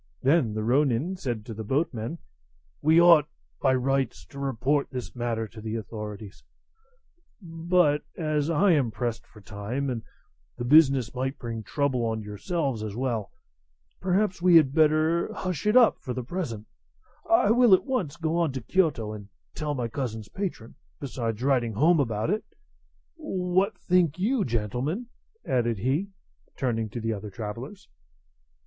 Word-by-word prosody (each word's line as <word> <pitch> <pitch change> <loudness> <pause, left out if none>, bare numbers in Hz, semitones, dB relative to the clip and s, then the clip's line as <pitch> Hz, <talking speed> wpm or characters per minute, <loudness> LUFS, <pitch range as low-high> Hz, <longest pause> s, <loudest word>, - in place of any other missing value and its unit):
Then 135 -6 +3
the 110 - -2
ronin 135 +7 +1
said 120 - -4
to 115 - -6
the 110 +1 -6
boatmen: 130 +2 -2 0.6
"We 160 +2 +5
ought, 170 -4 +6 0.3
by 130 - +3
rights, 130 -8 -1
to 140 - -9
report 140 +2 0
this 125 -1 -6
matter 115 -2 -2
to 110 0 -11
the 110 0 -4
authorities; 105 -1 -7 1.0
but 165 -4 +1 0.2
as 155 -2 0
I 180 +4 +3
am 140 -7 +3
pressed 115 +1 -4
for 105 - -16
time, 110 +7 -4
and 115 -2 -3 0.6
the 120 - -4
business 135 -4 +5
might 130 +2 -3
bring 115 -3 -5
trouble 130 +1 -1
on 110 -1 -2
yourselves 130 - -3
as 105 -2 -5
well, 120 -5 -2 0.7
perhaps 190 0 0
we 180 -1 +5
had 145 -5 +6
better 155 +2 +3
hush 180 -1 -3
it 210 +4 +5
up 245 -3 +5
for 125 -3 -5
the 125 - -3
present; 120 - -4 0.6
I 220 -2 +4
will 240 -4 +7
at - - -4
once 205 - -2
go 165 0 -1
on 165 -5 +1
to 130 - -4
Kiyoto 125 - 0
and 105 -2 -10 0.2
tell 150 -1 -3
my 125 -3 -2
cousin's 115 -4 -5
patron, 180 - -5 0.3
besides 120 -4 -4
writing 125 -5 +1
home 155 - +4
about 115 - 0
it. 215 +1 -1 0.7
What 185 +3 0
think 175 -4 +2
you, 220 +5 +1
gentlemen?" 125 - -2 0.4
added 120 -3 0
he, 135 - 0 0.5
turning 115 -4 -1
to 120 - -6
the 115 0 -1
other 105 0 -6
travellers. 115 - -7
135 Hz, 155 wpm, -26 LUFS, 115-165 Hz, 1.0 s, will